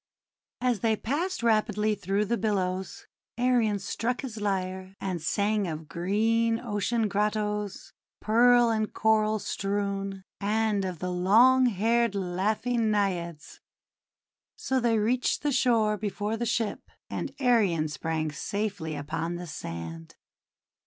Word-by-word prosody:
As 245 Hz, -4 st, +1 dB
they 220 Hz, +2 st, +2 dB
passed 305 Hz, -, -2 dB
rapidly 215 Hz, -1 st, +2 dB
through 200 Hz, +1 st, -1 dB
the 235 Hz, -, 0 dB
billows, 190 Hz, -4 st, -2 dB, 0.3 s
Arion 240 Hz, -4 st, +2 dB
struck 230 Hz, +5 st, -2 dB
his 230 Hz, -6 st, -6 dB
lyre, 190 Hz, -1 st, -2 dB
and 185 Hz, -4 st, -3 dB
sang 205 Hz, +4 st, 0 dB
of 155 Hz, -1 st, -5 dB
green 225 Hz, +7 st, +1 dB
ocean 225 Hz, 0 st, -1 dB
grottoes, 210 Hz, 0 st, -2 dB, 0.3 s
pearl 240 Hz, +1 st, +5 dB
and 215 Hz, -1 st, -1 dB
coral 215 Hz, 0 st, +2 dB
strewn, 195 Hz, -1 st, -3 dB, 0.2 s
and 210 Hz, -1 st, +1 dB
of 180 Hz, -2 st, -4 dB
the 180 Hz, +3 st, -3 dB
long 235 Hz, +9 st, +5 dB
haired 230 Hz, +1 st, +1 dB
laughing 215 Hz, +5 st, 0 dB
Naiads. 175 Hz, -6 st, -2 dB, 1.0 s
So 265 Hz, 0 st, -1 dB
they 235 Hz, -2 st, +2 dB
reached 240 Hz, +6 st, +1 dB
the 295 Hz, -, +1 dB
shore 230 Hz, -5 st, +2 dB
before 205 Hz, +1 st, -2 dB
the 235 Hz, +1 st, -2 dB
ship, 225 Hz, -1 st, -2 dB, 0.2 s
and -, -, -4 dB
Arion 210 Hz, -, +3 dB
sprang 155 Hz, 0 st, -2 dB
safely 190 Hz, -1 st, -3 dB
upon 155 Hz, +4 st, -3 dB
the 175 Hz, +1 st, -6 dB
sand. 85 Hz, -, -7 dB
210 Hz, 125 wpm, -28 LUFS, 185-230 Hz, 1.0 s, pearl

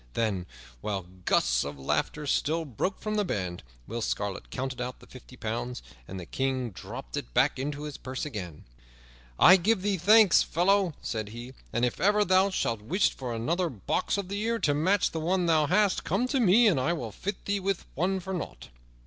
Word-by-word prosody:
Then, 100 Hz, -6 st, -1 dB, 0.3 s
while 95 Hz, -, -3 dB, 0.2 s
gusts -, -, +2 dB
of 70 Hz, 0 st, -6 dB
laughter 75 Hz, -, -1 dB
still 160 Hz, +3 st, 0 dB
broke 150 Hz, -, -3 dB
from 215 Hz, 0 st, -2 dB
the 210 Hz, -, +2 dB
band, 90 Hz, -, -3 dB, 0.2 s
Will 115 Hz, +2 st, -5 dB
Scarlet 100 Hz, -3 st, -3 dB
counted 130 Hz, -1 st, -4 dB
out 125 Hz, +1 st, -5 dB
the -, -, -15 dB
fifty 130 Hz, 0 st, -14 dB
pounds, 120 Hz, +2 st, -4 dB, 0.2 s
and 95 Hz, -, -6 dB
the 90 Hz, -, -7 dB
King 130 Hz, 0 st, -2 dB
dropped 65 Hz, -7 st, -8 dB
it -, -, -6 dB
back -, -, +3 dB
into 145 Hz, +2 st, -3 dB
his 150 Hz, -2 st, -6 dB
purse 130 Hz, +2 st, -4 dB
again. 90 Hz, -, -6 dB, 0.7 s
"I 185 Hz, -, +8 dB
give 190 Hz, +2 st, +1 dB
thee 200 Hz, -1 st, +1 dB
thanks, 205 Hz, +2 st, +6 dB
fellow," 185 Hz, -1 st, +2 dB
said 110 Hz, -3 st, -3 dB
he, 120 Hz, +4 st, -9 dB, 0.2 s
"and 120 Hz, +1 st, +1 dB
if 125 Hz, -, -3 dB
ever 205 Hz, +2 st, +4 dB
thou 190 Hz, +1 st, +4 dB
shouldst 115 Hz, -, -1 dB
wish 185 Hz, -, +1 dB
for 125 Hz, -2 st, -5 dB
another 170 Hz, +10 st, 0 dB
box 115 Hz, -, -1 dB
of 200 Hz, -2 st, -3 dB
the 200 Hz, +2 st, -3 dB
ear 230 Hz, +1 st, 0 dB
to 150 Hz, -9 st, +1 dB
match 185 Hz, +7 st, +2 dB
the 165 Hz, -, -3 dB
one 180 Hz, +3 st, +1 dB
thou 155 Hz, -3 st, +3 dB
hast, 195 Hz, +3 st, +2 dB
come 200 Hz, +9 st, 0 dB
to 270 Hz, -, +1 dB
me 230 Hz, +1 st, +5 dB
and 185 Hz, -11 st, +4 dB
I 150 Hz, +7 st, +1 dB
will 120 Hz, -10 st, -4 dB
fit 195 Hz, -, -5 dB
thee 200 Hz, 0 st, 0 dB
with 195 Hz, -1 st, -1 dB
it 190 Hz, +5 st, 0 dB
for 190 Hz, -, -4 dB
nought." 105 Hz, -, -6 dB
150 Hz, 200 wpm, -28 LUFS, 115-190 Hz, 0.7 s, I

